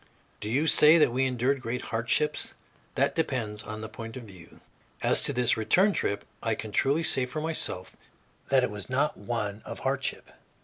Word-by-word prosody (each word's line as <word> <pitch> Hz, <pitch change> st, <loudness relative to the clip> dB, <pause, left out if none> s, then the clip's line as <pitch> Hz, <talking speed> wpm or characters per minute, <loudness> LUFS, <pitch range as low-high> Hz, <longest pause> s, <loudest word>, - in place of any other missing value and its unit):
Do 105 Hz, -, -5 dB
you 140 Hz, +7 st, +1 dB
say 155 Hz, 0 st, +7 dB
that 150 Hz, -, +4 dB
we 130 Hz, +1 st, +1 dB
endured 130 Hz, +2 st, 0 dB
great 120 Hz, +1 st, -4 dB
hardships? 120 Hz, +7 st, 0 dB, 0.4 s
That -, -, +2 dB
depends 115 Hz, -9 st, -2 dB
upon 110 Hz, 0 st, -7 dB
the 110 Hz, -, -5 dB
point 115 Hz, +2 st, -8 dB
of 125 Hz, -, -8 dB
view. 95 Hz, -6 st, -15 dB, 0.4 s
As -, -, +5 dB
to -, -, +1 dB
this 125 Hz, -2 st, +2 dB
return 185 Hz, -, +3 dB
trip, 100 Hz, -, -2 dB, 0.2 s
I 115 Hz, -1 st, 0 dB
can 110 Hz, -1 st, -7 dB
truly 140 Hz, +9 st, +1 dB
say 130 Hz, -5 st, +3 dB
for 155 Hz, +5 st, -5 dB
myself 155 Hz, -, -2 dB, 0.5 s
that 135 Hz, -2 st, +4 dB
it 125 Hz, -, -1 dB
was 105 Hz, +1 st, -8 dB
not 140 Hz, +4 st, 0 dB
one 105 Hz, -1 st, -4 dB
of -, -, -8 dB
hardship. -, -, -3 dB
120 Hz, 185 wpm, -27 LUFS, 110-140 Hz, 0.5 s, say